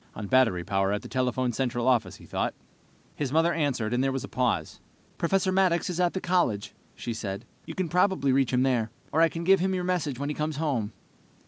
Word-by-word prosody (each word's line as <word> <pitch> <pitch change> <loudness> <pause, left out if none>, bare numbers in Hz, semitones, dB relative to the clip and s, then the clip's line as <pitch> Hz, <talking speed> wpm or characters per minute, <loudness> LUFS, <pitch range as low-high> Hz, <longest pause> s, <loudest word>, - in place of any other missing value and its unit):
On 105 - -5
battery 110 -6 +3
power 95 +2 0
at 105 - -2
the - - -7
telephone 125 0 0
central 120 0 -1
office, 125 -4 +2
he - - -14
thought. - - -2 0.6
His 140 -4 -2
mother 165 +3 +3
answered, 130 -8 0
and 125 +2 +2
there 135 - +1
was 135 -1 -3
a - - -5
pause. 125 -2 -1 0.4
"Professor 190 +2 +1
Maddox 185 -2 +2
is 175 - -4
at 175 -1 +2
the 190 - -1
college," 175 - 0 0.2
she 120 - -4
said. 100 -3 -5 0.2
"You - - -6
can 185 -2 -1
probably 180 -4 +2
reach 135 -1 +2
him 125 0 +3
there, 120 -4 +1 0.2
or 160 - +2
I 165 - +6
can 165 +1 -5
give 190 +2 +5
him 190 +1 0
your 180 - -2
message 175 -7 -1
when 140 +2 -3
he - - -1
comes 150 +1 -2
home." 135 -9 -1
135 Hz, 225 wpm, -27 LUFS, 120-170 Hz, 0.6 s, I